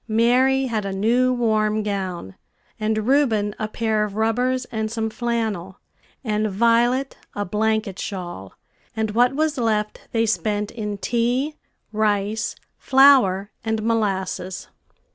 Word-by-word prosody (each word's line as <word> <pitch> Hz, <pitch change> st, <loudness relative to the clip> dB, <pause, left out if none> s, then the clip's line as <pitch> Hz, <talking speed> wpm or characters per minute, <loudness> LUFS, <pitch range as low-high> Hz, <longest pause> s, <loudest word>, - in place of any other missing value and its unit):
Mary 250 Hz, +4 st, +3 dB
had 225 Hz, -4 st, -2 dB
a 195 Hz, -, -3 dB
new 235 Hz, +6 st, +2 dB
warm 215 Hz, -3 st, +1 dB
gown, 185 Hz, -, -4 dB, 0.5 s
and 215 Hz, 0 st, -1 dB
Reuben 230 Hz, -7 st, +2 dB
a 215 Hz, -, -1 dB
pair 220 Hz, -1 st, 0 dB
of 205 Hz, -1 st, -4 dB
rubbers 245 Hz, +4 st, 0 dB
and 220 Hz, -1 st, -2 dB
some 220 Hz, -1 st, -2 dB
flannel, 220 Hz, -6 st, -2 dB, 0.5 s
and 215 Hz, -2 st, 0 dB
Violet 235 Hz, +6 st, +2 dB, 0.2 s
a 205 Hz, -, -2 dB
blanket 215 Hz, 0 st, -1 dB
shawl, 175 Hz, -, -6 dB, 0.4 s
and 220 Hz, -1 st, -1 dB
what 245 Hz, +4 st, +3 dB
was 305 Hz, -2 st, 0 dB
left 215 Hz, -2 st, -1 dB
they 225 Hz, -1 st, +1 dB
spent 210 Hz, -2 st, -1 dB
in 210 Hz, -3 st, -4 dB
tea, 245 Hz, +7 st, 0 dB, 0.4 s
rice, 210 Hz, 0 st, 0 dB, 0.2 s
flour, 260 Hz, -8 st, +5 dB
and 220 Hz, -1 st, -1 dB
molasses. 195 Hz, -4 st, -2 dB
220 Hz, 125 wpm, -22 LUFS, 210-240 Hz, 0.5 s, flour